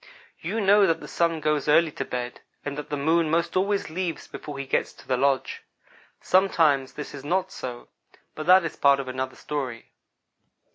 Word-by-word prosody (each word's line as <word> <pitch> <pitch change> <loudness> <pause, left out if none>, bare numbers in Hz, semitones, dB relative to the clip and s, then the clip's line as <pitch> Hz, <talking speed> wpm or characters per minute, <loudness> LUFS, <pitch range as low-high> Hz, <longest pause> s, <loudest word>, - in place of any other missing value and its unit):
"You 225 - -3
know 200 -1 +5
that 165 -1 +1
the - - -9
Sun 165 -2 0
goes 150 -2 0
early 160 +2 +4
to - - -4
bed, 125 -1 -5 0.2
and 145 -1 -3
that 150 - -6
the 145 - -2
Moon 160 +3 +2
most 170 +2 0
always 195 -2 0
leaves 175 0 -3
before 145 -2 -8
he 135 - -4
gets - - 0
to - - -18
the 130 - +2
lodge. 135 +1 0 0.6
Sometimes 160 -8 +3
this 150 - -7
is 140 -2 -8
not 185 +5 0
so, 120 -1 -7 0.5
but 155 - -7
that 185 -1 +7
is - - -4
part 140 -1 +4
of 135 - -4
another 130 0 -4
story. 130 -6 -5
150 Hz, 190 wpm, -25 LUFS, 135-170 Hz, 0.6 s, that